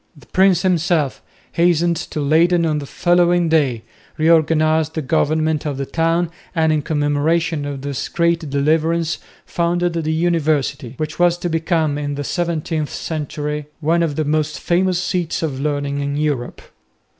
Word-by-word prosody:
The 140 - -17
prince 190 -2 +3
himself 170 -5 +1 0.3
hastened 170 0 +2
to 165 -1 -5
Leyden 165 +4 +3
on 155 -2 0
the 140 - -7
following 175 0 +2
day, 140 -8 +1 0.3
reorganised 160 -1 +3
the 160 - -2
government 155 +3 +1
of 145 -3 -3
the 140 - -3
town 165 +3 0 0.2
and 160 -1 +3
in 155 - +1
commemoration 150 +1 0
of 140 -2 -6
this 140 -2 -4
great 170 -2 0
deliverance 160 +3 +1 0.3
founded 175 0 0
the 160 -2 -1
University, 155 -6 0
which 155 +1 -4
was 175 0 +3
to 175 - -3
become 160 -2 0
in 145 -1 -3
the 145 - -4
17th 160 -2 -2
century 150 -1 -4
one 165 +2 +1
of 160 -4 0
the 155 - -1
most 155 +1 -1
famous 180 +1 +1
seats 180 -2 -2
of 140 -5 -2
learning 145 -1 -2
in 140 0 -2
Europe. 145 -5 -2
160 Hz, 155 wpm, -19 LUFS, 145-170 Hz, 0.3 s, prince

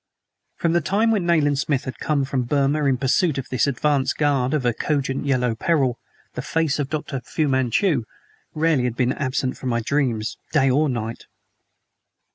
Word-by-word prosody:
From 170 -1 0
the 175 - +3
time 200 +8 +1
when 200 -6 0
Nayland 145 -4 +2
Smith 140 -2 0
had 130 - -6
come 145 -3 0
from 135 -1 -1
Burma 145 +3 +1
in 135 -2 +2
pursuit 140 +4 +1
of 135 - -3
this 130 +2 +2
advance 140 0 +1
guard 140 -4 +1
of 140 -4 -1
a 120 - +2
cogent 140 +1 -1
Yellow 125 -3 +1
Peril, 130 0 0 0.3
the - - -4
face 155 +1 0
of 140 -2 -2
Dr. 150 -3 -4
Fu 155 +5 -1
Manchu 130 - +1 0.5
rarely 155 -5 +2
had 120 -2 -2
been 125 +1 +1
absent 130 -2 -2
from 130 - -3
my 115 -1 0
dreams 120 -4 -1 0.2
day 135 -4 +4
or 150 +3 +2
night. 115 -2 -4
140 Hz, 180 wpm, -22 LUFS, 125-155 Hz, 0.5 s, day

